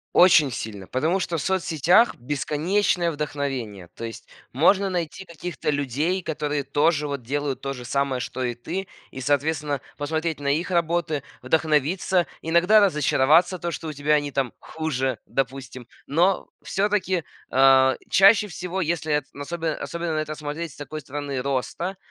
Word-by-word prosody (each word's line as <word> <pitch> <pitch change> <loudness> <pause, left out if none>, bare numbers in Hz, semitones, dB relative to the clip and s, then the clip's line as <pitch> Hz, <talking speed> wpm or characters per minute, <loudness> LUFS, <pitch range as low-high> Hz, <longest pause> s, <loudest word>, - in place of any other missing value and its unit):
Очень 165 -6 +6
сильно, 105 -4 -6
потому 160 +9 0
что 170 -2 -2
в - - -2
соцсетях 185 - +3
бесконечное 165 +7 0
вдохновение. 135 - -4
То 115 - -6
есть 115 -1 -8 0.3
можно 190 +8 +4
найти 180 +1 -3
каких-то 170 -1 -5
людей, 150 +6 0
которые 150 -2 -2
тоже 145 +2 +1
вот 140 -2 -4
делают 140 +2 -2
то 135 0 -3
же 125 -2 -8
самое, 135 0 0
что 130 - -5
и 120 -1 -1
ты. 175 +11 -5 0.2
И, 130 - -7
соответственно, 145 0 0 0.2
посмотреть 160 +2 -2
на 140 - -4
их 160 +6 0
работы, 170 -4 0 0.2
вдохновиться, 160 +5 +1 0.2
иногда 170 +6 +4
разочароваться, 160 -1 +3
то 170 +1 -3
что 160 0 -5
у 155 - -5
тебя 145 +2 +1
они 145 -1 +1
там 130 -2 -1
хуже, 135 -7 -2
допустим. 130 -2 -4 0.2
Но 175 +6 +2 0.2
всё-таки, 190 0 0 0.3
э, 130 0 +6
чаще 205 +2 +6
всего, 180 +1 -4
если 160 -2 -1
эт 150 - +1
особенно 160 +2 -3
особенно 170 -1 -4
на 155 - 0
это 155 0 -3
смотреть 150 +2 -5
с - - -16
такой 155 +1 -6
стороны 140 -1 -4
роста, 140 +8 -2
150 Hz, 155 wpm, -24 LUFS, 135-170 Hz, 0.3 s, Очень